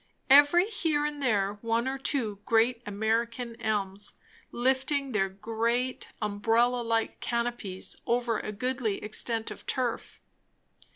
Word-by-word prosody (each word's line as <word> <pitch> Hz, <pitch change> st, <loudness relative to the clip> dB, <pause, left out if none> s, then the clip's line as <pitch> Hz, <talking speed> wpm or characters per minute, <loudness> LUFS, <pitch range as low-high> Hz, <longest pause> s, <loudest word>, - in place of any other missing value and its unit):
Every 290 Hz, +7 st, +7 dB
here 325 Hz, -9 st, 0 dB
and 295 Hz, -1 st, -3 dB
there 205 Hz, -5 st, +1 dB
one 230 Hz, +2 st, 0 dB
or 270 Hz, +1 st, -2 dB
two 230 Hz, -7 st, -1 dB
great 230 Hz, +1 st, +2 dB
American 230 Hz, +3 st, -1 dB
elms, 205 Hz, -2 st, -1 dB, 0.4 s
lifting 265 Hz, +2 st, 0 dB
their 195 Hz, -4 st, +1 dB
great 230 Hz, +5 st, -1 dB, 0.2 s
umbrella 225 Hz, +4 st, +2 dB
like 230 Hz, -1 st, -1 dB
canopies 235 Hz, -5 st, -2 dB
over 235 Hz, -2 st, +1 dB
a -, -, -4 dB
goodly 235 Hz, -1 st, -2 dB
extent 225 Hz, +1 st, -1 dB
of -, -, -9 dB
turf. 250 Hz, -3 st, -2 dB
235 Hz, 120 wpm, -29 LUFS, 215-255 Hz, 0.4 s, Every